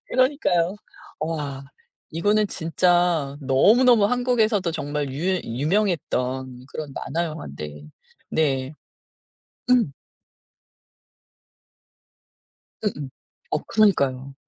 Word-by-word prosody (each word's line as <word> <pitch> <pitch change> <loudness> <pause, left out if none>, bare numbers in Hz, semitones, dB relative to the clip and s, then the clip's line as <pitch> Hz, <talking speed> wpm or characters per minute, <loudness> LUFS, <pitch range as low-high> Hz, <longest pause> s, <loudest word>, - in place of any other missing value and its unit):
그러니까요. 240 - +2 0.4
와 145 -4 -3 0.5
이거는 205 +6 +2
진짜 170 -4 +1
너무너무 210 - +5
한국에서도 225 -6 +1
정말 145 -3 -3
유 180 +7 0
유명했던 130 - -1
그런 150 -2 -6
만화 170 +5 -2
영환데. 75 - -7 0.5
네. 135 -3 0 1.0
음. 245 - +4 2.9
으음 150 -10 -2 0.4
어 - - +1
그러니까요. 140 -11 +2
160 Hz, 180 characters per minute, -23 LUFS, 135-205 Hz, 2.9 s, 너무너무